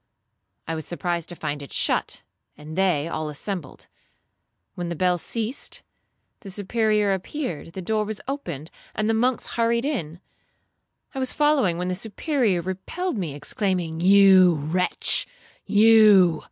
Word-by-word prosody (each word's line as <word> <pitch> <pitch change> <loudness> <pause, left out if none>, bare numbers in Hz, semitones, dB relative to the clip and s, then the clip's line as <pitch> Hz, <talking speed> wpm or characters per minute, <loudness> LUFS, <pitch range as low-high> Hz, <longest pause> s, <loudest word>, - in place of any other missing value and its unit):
I 165 - -2
was 160 -1 -5
surprised 175 -1 -3
to 175 - -6
find 150 -3 -4
it 140 - -10
shut, - - 0 0.3
and 150 +1 -9
they 175 -6 +1
all 155 -2 -4
assembled. 170 +2 -6 0.9
When 175 -1 -5
the 170 - -3
bell 180 +1 +1
ceased, 230 - -3 0.6
the 205 - -10
Superior 210 +1 +1
appeared, 190 - -5
the 190 -1 -6
door 215 +3 0
was 210 0 -5
opened, 170 - -5 0.2
and 215 +1 -1
the 225 - +2
monks 245 +3 +1
hurried 235 +1 0
in. 175 - -3 0.9
I 270 - -4
was 260 -1 +1
following, 290 - +2
when 180 +1 -3
the - - -1
Superior 215 - -1
repelled 210 - -4
me, 160 -7 -4
exclaiming, 175 0 -2
'You, 190 -1 +6
wretch, 160 +5 0 0.4
you! 205 -6 +6
190 Hz, 140 wpm, -24 LUFS, 170-220 Hz, 0.9 s, You